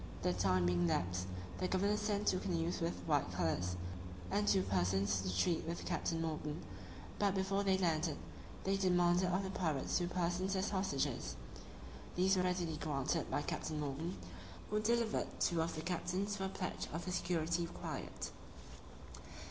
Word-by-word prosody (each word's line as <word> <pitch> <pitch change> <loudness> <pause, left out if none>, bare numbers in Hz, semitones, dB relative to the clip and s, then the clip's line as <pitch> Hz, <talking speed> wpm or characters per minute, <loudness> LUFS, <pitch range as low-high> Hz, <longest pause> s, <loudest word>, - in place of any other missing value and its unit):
The 90 - +3
time 90 0 +3
being 90 0 +3
elapsed, 90 +1 0 0.3
the 185 - +1
governor 200 +3 +2
sent 210 -1 0
two 185 - +4
canoes 170 -2 -1
with 165 +1 -1
white 145 - +2
colours, 90 0 0 0.6
and 105 +1 +2
two 95 -2 +5
persons 95 +1 +2
to 90 -1 -2
treat 170 -3 +2
with 170 +1 -3
Captain 165 -1 0
Morgan; 155 -1 -2 0.6
but, 200 -1 +3
before 195 +1 +1
they 190 -1 +4
landed, 165 -4 +1 0.5
they 195 +1 +2
demanded 180 -1 +4
of 185 +2 +1
the 190 - -3
pirates 160 -6 0
two 175 - 0
persons 180 +2 0
as 190 +2 0
hostages. 140 - 0 0.8
These 190 +2 +4
were 185 - +3
readily 180 -3 0
granted 150 +1 0
by 145 - 0
Captain 155 +1 -2
Morgan, 150 +4 -2 0.5
who 210 - +2
delivered 230 +1 +2
them - - -13
two 170 -2 +3
of 165 - -1
the 155 - -3
captains 185 +4 -1
for 190 -2 -2
a - - -1
pledge 185 -1 -3
of 165 +3 -3
the 180 - -2
security 170 -1 0
required. - - -5
170 Hz, 165 wpm, -37 LUFS, 140-190 Hz, 0.8 s, two